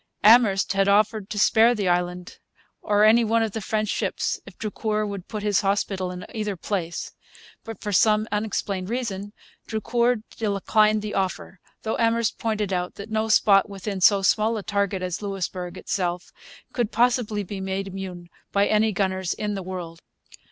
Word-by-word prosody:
Amherst 210 Hz, -3 st, +5 dB
had 195 Hz, 0 st, +2 dB
offered 210 Hz, 0 st, +2 dB
to 210 Hz, -, -5 dB
spare 225 Hz, +3 st, +5 dB
the 205 Hz, -4 st, -1 dB
island 180 Hz, 0 st, -1 dB, 0.4 s
or 210 Hz, -1 st, +2 dB
any 225 Hz, +2 st, +6 dB
one 225 Hz, +1 st, +2 dB
of 220 Hz, -, -2 dB
the 220 Hz, -, -4 dB
French 215 Hz, +1 st, -1 dB
ships -, -, -1 dB
if -, -, -13 dB
Drucour 215 Hz, 0 st, -2 dB
would 200 Hz, -3 st, -6 dB
put 215 Hz, -2 st, -5 dB
his 205 Hz, -2 st, +2 dB
hospital 195 Hz, -1 st, -1 dB
in 180 Hz, 0 st, -7 dB
either 210 Hz, -4 st, -3 dB
place. 175 Hz, -2 st, -3 dB, 0.5 s
But, 225 Hz, -1 st, -9 dB
for 210 Hz, -, -3 dB
some 215 Hz, +2 st, +3 dB
unexplained 205 Hz, -3 st, -2 dB
reason, 205 Hz, -5 st, -3 dB, 0.4 s
Drucour 235 Hz, +1 st, 0 dB
declined 215 Hz, 0 st, +2 dB
the 210 Hz, -, -4 dB
offer; 190 Hz, 0 st, -3 dB, 0.2 s
though 220 Hz, -, -2 dB
Amherst 230 Hz, -2 st, +1 dB
pointed 215 Hz, -3 st, -1 dB
out 180 Hz, 0 st, -2 dB
that 205 Hz, +2 st, -9 dB
no 220 Hz, 0 st, 0 dB
spot 200 Hz, -2 st, +4 dB
within 195 Hz, 0 st, -5 dB
so 195 Hz, +1 st, +5 dB
small 220 Hz, +3 st, +2 dB
a 210 Hz, -, -5 dB
target 200 Hz, -2 st, -1 dB
as 180 Hz, +1 st, -3 dB
Louisbourg 185 Hz, -2 st, -4 dB
itself 180 Hz, -3 st, -3 dB, 0.4 s
could 240 Hz, -4 st, -1 dB
possibly 235 Hz, -3 st, +1 dB
be 195 Hz, +1 st, -6 dB
made 190 Hz, +1 st, -3 dB
immune 185 Hz, -2 st, -7 dB, 0.2 s
by 200 Hz, 0 st, +3 dB
any 215 Hz, +1 st, +2 dB
gunners 190 Hz, -2 st, -1 dB
in 210 Hz, -1 st, -3 dB
the 195 Hz, -, -4 dB
world. 175 Hz, -3 st, -7 dB
205 Hz, 170 wpm, -24 LUFS, 190-215 Hz, 0.5 s, any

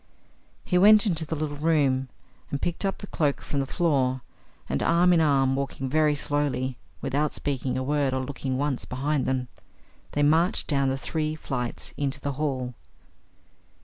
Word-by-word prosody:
He 180 Hz, -, +2 dB
went 210 Hz, +3 st, +7 dB
into 165 Hz, -6 st, 0 dB
the 160 Hz, -, -2 dB
little 145 Hz, -1 st, -3 dB
room 140 Hz, -4 st, +2 dB, 0.4 s
and 140 Hz, -, -2 dB
picked 175 Hz, +5 st, -2 dB
up 195 Hz, -, -1 dB
the -, -, -8 dB
cloak 150 Hz, -7 st, 0 dB
from 140 Hz, -, -3 dB
the 135 Hz, -, -1 dB
floor, 135 Hz, -5 st, +1 dB, 0.5 s
and, 70 Hz, -, -1 dB
arm 175 Hz, +2 st, +4 dB
in 165 Hz, -, +4 dB
arm, 135 Hz, -3 st, +3 dB
walking 135 Hz, -1 st, -3 dB
very 155 Hz, +1 st, +3 dB
slowly, 140 Hz, -3 st, -1 dB, 0.3 s
without 145 Hz, +3 st, 0 dB
speaking 135 Hz, -3 st, -2 dB
a 130 Hz, -, -1 dB
word 145 Hz, 0 st, +1 dB
or 130 Hz, 0 st, -1 dB
looking 130 Hz, -1 st, -3 dB
once 140 Hz, -2 st, -1 dB
behind 135 Hz, +1 st, -1 dB
them, 130 Hz, -1 st, 0 dB, 0.7 s
they 145 Hz, -, +2 dB
marched 160 Hz, +5 st, +3 dB
down 140 Hz, -3 st, +1 dB
the 135 Hz, -, -1 dB
three 155 Hz, +2 st, -2 dB
flights 125 Hz, -6 st, -4 dB
into 140 Hz, 0 st, -2 dB
the 140 Hz, -, -3 dB
hall. 130 Hz, -3 st, -2 dB
145 Hz, 170 wpm, -26 LUFS, 130-155 Hz, 0.7 s, went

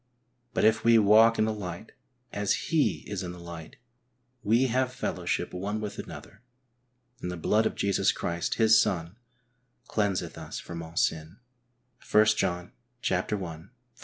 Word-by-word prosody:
But -, -, +2 dB
if 110 Hz, 0 st, +3 dB
we 115 Hz, 0 st, +6 dB
walk 110 Hz, +2 st, +6 dB
in 110 Hz, -, +3 dB
the 110 Hz, -, -1 dB
light, 95 Hz, -1 st, -7 dB, 0.4 s
as 105 Hz, +9 st, -1 dB
He 160 Hz, -3 st, +2 dB
is 100 Hz, -3 st, -4 dB
in 90 Hz, -1 st, -5 dB
the 90 Hz, -, -11 dB
light, 85 Hz, -2 st, -9 dB, 0.7 s
we 115 Hz, +3 st, +3 dB
have 130 Hz, +1 st, +1 dB
fellowship 125 Hz, -, -3 dB
one 100 Hz, +4 st, -3 dB
with 105 Hz, -1 st, -5 dB
another, -, -, -10 dB, 0.8 s
and 90 Hz, -, -3 dB
the 90 Hz, -, -5 dB
blood 110 Hz, +6 st, +2 dB
of -, -, -5 dB
Jesus 100 Hz, -1 st, +2 dB
Christ, 85 Hz, 0 st, -2 dB
His 110 Hz, -1 st, +6 dB
Son, 85 Hz, -3 st, -2 dB, 0.7 s
cleanseth 100 Hz, -3 st, -1 dB
us -, -, -6 dB
from 85 Hz, -1 st, -7 dB
all 80 Hz, +1 st, -10 dB
sin 80 Hz, +3 st, 0 dB, 0.3 s
" 125 Hz, 0 st, -21 dB
(l 105 Hz, -, +8 dB
John 90 Hz, -5 st, 0 dB, 0.4 s
i. 90 Hz, -3 st, -2 dB
100 Hz, 155 wpm, -28 LUFS, 90-110 Hz, 0.8 s, l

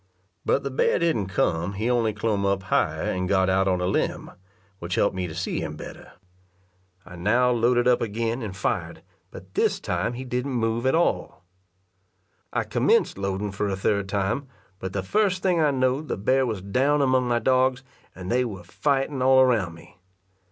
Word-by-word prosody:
But 140 Hz, -, +1 dB
the 140 Hz, -, -3 dB
bear 130 Hz, -, +2 dB
didn't 155 Hz, -, 0 dB
come 90 Hz, -1 st, 0 dB
he 110 Hz, +4 st, -2 dB
only 120 Hz, -3 st, +2 dB
clomb 105 Hz, -1 st, -1 dB
up 100 Hz, -1 st, 0 dB
higher, 95 Hz, -, 0 dB
and 90 Hz, 0 st, -2 dB
got 95 Hz, -1 st, +3 dB
out 95 Hz, +1 st, +2 dB
on 90 Hz, -1 st, +1 dB
a -, -, 0 dB
limb, 95 Hz, -, -1 dB, 0.5 s
which 85 Hz, +1 st, -3 dB
helped 100 Hz, -, +1 dB
me 90 Hz, -1 st, -2 dB
to 80 Hz, -, -8 dB
see -, -, -2 dB
him -, -, -5 dB
better. -, -, -10 dB, 0.9 s
I 90 Hz, 0 st, -11 dB
now 120 Hz, +8 st, +2 dB
loaded 120 Hz, +1 st, +2 dB
up 125 Hz, -1 st, +3 dB
again 115 Hz, +2 st, -2 dB
and 100 Hz, -4 st, -6 dB
fired, 100 Hz, -, -2 dB, 0.3 s
but -, -, -12 dB
this -, -, +1 dB
time 120 Hz, -, -2 dB
he 125 Hz, +2 st, -6 dB
didn't 125 Hz, +2 st, -2 dB
move 115 Hz, +1 st, 0 dB
at 130 Hz, -, +3 dB
all. 170 Hz, -, 0 dB, 1.1 s
I -, -, 0 dB
commenced -, -, +1 dB
loading 100 Hz, +1 st, -2 dB
for 100 Hz, +1 st, -2 dB
a 95 Hz, -, -1 dB
third 100 Hz, 0 st, 0 dB
fire, 100 Hz, +6 st, 0 dB, 0.4 s
but 95 Hz, 0 st, -5 dB
the 100 Hz, -, -2 dB
first 190 Hz, -, +1 dB
thing 180 Hz, -3 st, +2 dB
I 150 Hz, -, +4 dB
knowed, 130 Hz, +2 st, 0 dB
the -, -, -2 dB
bear 130 Hz, +6 st, +2 dB
was 105 Hz, -5 st, -4 dB
down 135 Hz, +8 st, +2 dB
among 130 Hz, -1 st, +2 dB
my 120 Hz, -1 st, +2 dB
dogs, 130 Hz, +1 st, +2 dB, 0.3 s
and 90 Hz, 0 st, -6 dB
they 125 Hz, +1 st, +3 dB
were 100 Hz, -7 st, -6 dB
fighting 135 Hz, -, -1 dB
all 130 Hz, +1 st, +5 dB
around 115 Hz, -10 st, +2 dB
me. 85 Hz, -, -17 dB
115 Hz, 190 wpm, -25 LUFS, 95-130 Hz, 1.1 s, all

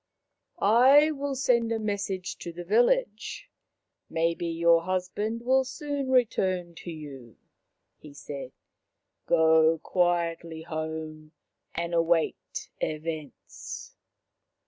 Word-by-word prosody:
" -, -, -57 dB
I 270 Hz, +6 st, +6 dB
will 285 Hz, -2 st, -3 dB
send 235 Hz, -3 st, +2 dB
a 225 Hz, -, +1 dB
message 200 Hz, -3 st, -3 dB
to 170 Hz, -, -6 dB
the 175 Hz, +1 st, -8 dB
village; 245 Hz, -, +1 dB, 0.6 s
may 165 Hz, +1 st, +1 dB
be 170 Hz, 0 st, -4 dB
your 170 Hz, 0 st, +4 dB
husband 185 Hz, +6 st, -2 dB
will 260 Hz, +2 st, +3 dB
soon 285 Hz, 0 st, -4 dB
return 185 Hz, -8 st, +1 dB
to -, -, -8 dB
you," 140 Hz, -7 st, -9 dB, 0.6 s
he 150 Hz, -2 st, -13 dB
said. 140 Hz, -2 st, -7 dB, 0.4 s
" -, -, -55 dB
Go 160 Hz, 0 st, +5 dB
quietly 170 Hz, -1 st, -1 dB
home 155 Hz, -1 st, -6 dB, 0.4 s
and 170 Hz, +1 st, -3 dB
await 165 Hz, -1 st, 0 dB
events." 155 Hz, -3 st, -6 dB
175 Hz, 110 wpm, -27 LUFS, 160-230 Hz, 0.6 s, I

